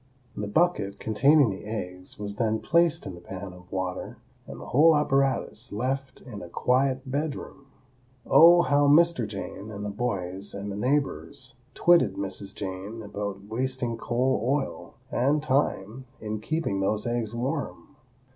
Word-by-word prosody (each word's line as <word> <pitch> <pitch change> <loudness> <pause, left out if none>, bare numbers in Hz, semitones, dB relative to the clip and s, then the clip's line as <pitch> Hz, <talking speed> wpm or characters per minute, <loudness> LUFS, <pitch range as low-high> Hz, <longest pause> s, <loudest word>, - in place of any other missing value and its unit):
The 105 - -3
bucket 105 - +1
containing 135 +3 +4
the 95 - -7
eggs 90 -4 -6
was 100 0 -6
then 110 -1 +1
placed 170 +5 +2
in - - -5
the 85 - -11
pan 95 +1 -7
of 90 0 -16
water 95 -1 -4 0.3
and 70 0 -8
the 70 - -9
whole 155 +4 +5
apparatus 135 -4 0
left 130 +4 -3
in 115 -6 -9
a 85 - -9
quiet 130 +5 +1
bedroom. 140 0 -4 0.6
Oh, 175 +1 +7
how 145 +2 +3
Mr. 155 -5 +4
Jane 100 0 -7
and 105 -1 -6
the 105 - -3
boys 100 -4 -3
and 100 +1 -5
the - - -5
neighbors 135 +2 -2 0.2
twitted 175 0 +4
Mrs. 95 0 -5
Jane 95 +4 -6
about 100 -1 -5
wasting 125 +2 -2
coal 120 0 0
oil 135 +3 -2 0.2
and 145 +4 +1
time 130 -4 0
in 110 0 -4
keeping 155 -7 -1
those 105 +2 0
eggs 120 -2 -2
warm! 140 +3 -4
115 Hz, 150 wpm, -27 LUFS, 100-140 Hz, 0.6 s, Oh